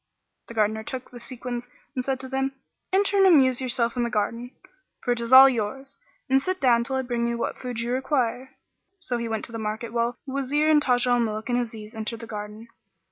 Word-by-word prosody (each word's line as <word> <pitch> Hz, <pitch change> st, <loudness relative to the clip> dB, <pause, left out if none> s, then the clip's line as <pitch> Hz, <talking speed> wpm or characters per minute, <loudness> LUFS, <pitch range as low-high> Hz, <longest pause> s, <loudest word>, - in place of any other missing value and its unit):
"[FN#39] -, -, -55 dB
The -, -, -9 dB
Gardener 220 Hz, 0 st, +1 dB
took 255 Hz, +2 st, -7 dB
the 245 Hz, -, -10 dB
sequins 245 Hz, 0 st, -5 dB, 0.3 s
and 255 Hz, -3 st, -2 dB
said 265 Hz, 0 st, -1 dB
to 260 Hz, -, -5 dB
them, 270 Hz, +1 st, -1 dB, 0.4 s
"Enter 400 Hz, +1 st, +2 dB
and 390 Hz, -1 st, +6 dB
amuse 265 Hz, -7 st, +5 dB
yourselves 240 Hz, -2 st, 0 dB
in 245 Hz, -, 0 dB
the 235 Hz, -, -1 dB
garden, 230 Hz, +2 st, -2 dB, 0.5 s
for 245 Hz, -, 0 dB
it 240 Hz, -1 st, +1 dB
is 235 Hz, +1 st, -4 dB
all 265 Hz, +1 st, +11 dB
yours; 265 Hz, +3 st, -3 dB, 0.3 s
and 270 Hz, 0 st, +3 dB
sit 370 Hz, +6 st, -2 dB
down 240 Hz, -4 st, +4 dB
till 265 Hz, +3 st, -3 dB
I 265 Hz, -, 0 dB
bring 240 Hz, -1 st, -1 dB
you 235 Hz, 0 st, -1 dB
what 235 Hz, -, -3 dB
food 245 Hz, -2 st, -5 dB
you 235 Hz, +1 st, -2 dB
require." 255 Hz, -1 st, -1 dB, 0.5 s
So 245 Hz, -8 st, -3 dB
he 235 Hz, -1 st, -3 dB
went 220 Hz, -1 st, -2 dB
to -, -, -10 dB
the 225 Hz, -, -5 dB
market 220 Hz, +2 st, -4 dB
while 235 Hz, +1 st, 0 dB
the 265 Hz, -, -7 dB
Wazir 290 Hz, +3 st, +1 dB
and 300 Hz, -1 st, +5 dB
Taj 250 Hz, -3 st, +2 dB
al 245 Hz, -1 st, +3 dB
Muluk 215 Hz, 0 st, -2 dB
and 245 Hz, 0 st, +2 dB
Aziz 220 Hz, -3 st, -6 dB
entered 220 Hz, +1 st, -4 dB
the -, -, -6 dB
garden. 210 Hz, +1 st, -7 dB
245 Hz, 235 wpm, -25 LUFS, 230-265 Hz, 0.5 s, all